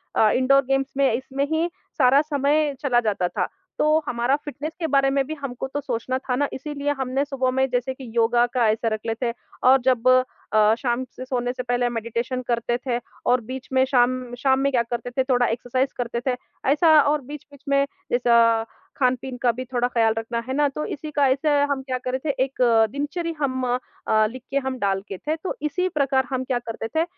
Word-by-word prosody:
अ, 215 - +5
indoor 275 +2 +4
games 270 +1 0
में, 275 -3 +4
इसमें 265 +3 -2
ही 320 +2 +1 0.3
सारा 270 0 +5
समय 295 0 +1
चला 250 -4 +3
जाता 205 -5 0
था। - - -2 0.3
तो - - +3 0.2
हमारा 245 +3 +1
फ़िटनेस 295 +1 -6
के 325 - -1
बारे 275 0 +4
में 275 0 +2
भी 310 - -3
हमको 260 -1 -4
तो 290 - -1
सोचना 255 0 -2
था 260 -1 -2
ना, 285 +2 +1
इसीलिए 290 +1 -3
हमने 265 +2 0
सुबह 265 -2 -1
में 265 +1 +1
जैसे 250 +1 -1
कि 260 -2 -10
योगा 235 +1 +4
का 240 -3 +3
ऐसा 220 +2 0
रख 215 - -2
लेते 235 +1 -1 0.3
और 265 - +8
जब 255 -1 +2 0.5
अ, 215 0 +5
शाम 240 +1 -1
से 255 - -7
सोने 245 -1 -1
से 250 - -5
पहले 245 0 0
मेडिटेशन 235 +2 -3
करते 240 0 0
थे 240 - +1 0.3
और 250 -1 +3
बीच 260 0 -6
में 260 - +4
शाम 255 -1 +1
शाम 265 +1 +2
में 275 +1 +1
क्या 245 -3 +3
करते 235 0 -4
थे, 260 +1 +1
थोड़ा 250 -2 +2
एक्सरसाइज़ 250 +3 -1
करते 235 -1 -2
थे। 260 - +3 0.4
ऐसा, 315 +3 +4
और 290 +1 +1
बीच-बीच 285 +1 -11
में 280 0 +3 0.3
जैसा 235 -2 +4 0.3
खान-पीन 255 -1 0
का 245 - +4
भी 255 +3 -6
थोड़ा 245 0 +2
ख़्याल 225 -3 +2
रखना, 230 +1 -2
है 260 - -2
ना? 290 +1 +3
तो 300 +2 -4
इसी 305 +1 -6
का 285 -2 +3
ऐसे 275 +4 +1 0.2
हम 270 -1 -1
क्या 260 -1 -2
कर 255 0 -4
रहे 265 +3 -2
थे, - - +2
एक 270 -1 -5 0.3
दिनचर्या 330 +4 -3
हम 260 -1 0 0.4
अ, 215 0 +4
लिख 255 0 -9
के 275 - +1
हम 260 - -2
डालते 195 -1 -2
थे, 310 +8 -2
तो 345 +3 -5
इसी 335 +5 0
प्रकार 275 -5 +1
हम 260 -1 -1
क्या 255 -2 -1
करते 225 0 -4
थे 320 - +3
260 Hz, 210 wpm, -23 LUFS, 240-280 Hz, 0.5 s, और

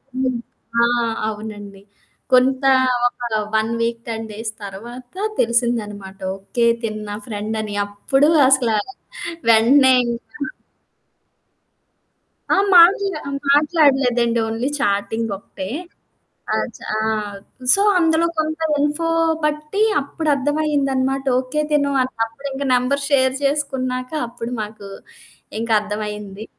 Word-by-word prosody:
హ్మ్. 255 -2 0 0.5
ఆ! - - +6 0.4
అవునండి. 205 -2 -8 0.5
కొంతా 265 +1 +4 0.4
ఒక 245 - -8 0.3
1 220 +1 +1
వీక్, 230 0 -1
10 225 -1 -4
డేస్ 220 +1 -5
తర్వాత 240 - -9 0.2
తెలిసిందనమాట. 220 -5 -1 0.2
ఓకే. 235 +4 -1 0.2
తిను 215 -1 -3
నా 205 - -4
ఫ్రెండని. 215 -1 -4
అప్పుడు 270 +9 +1 0.2
అసల 260 -4 +3 0.8
వెంటనే 260 +4 +6
ఇంకా 235 +5 -6 2.2
ఆ! - - +5 0.2
మాట్లా 360 0 +6 0.3
మాట్లాడలేదండి. 270 -6 +3
ఓన్లీ 225 +4 -2
చాటింగొకటే. 205 -2 -2 0.9
ఆ - - +2 0.2
చ్ - - -18 0.2
ఆ! - - 0 0.7
సో 395 - +4 0.2
అందులో 325 0 +3
కొంత 315 +1 -1 0.2
ఇన్ఫో 295 +3 0 0.4
బట్టి 300 +7 -1 0.2
అప్పుడర్థమయిందన్నమాట. 280 -2 0 0.2
ఓకే. 265 +4 -3
తిను 285 -1 +2
అన్ 255 - -4
అప్పుడింక 275 +4 -7
నంబర్ 265 +3 +1
షేర్ 260 -2 +3
చేసుకున్నాక 260 -3 -1 0.2
అప్పుడు 235 +1 -7
మాకు 210 -1 -9 0.7
ఇంకర్థమైంది. 210 -2 -2
250 Hz, 95 wpm, -20 LUFS, 220-280 Hz, 2.2 s, ఆ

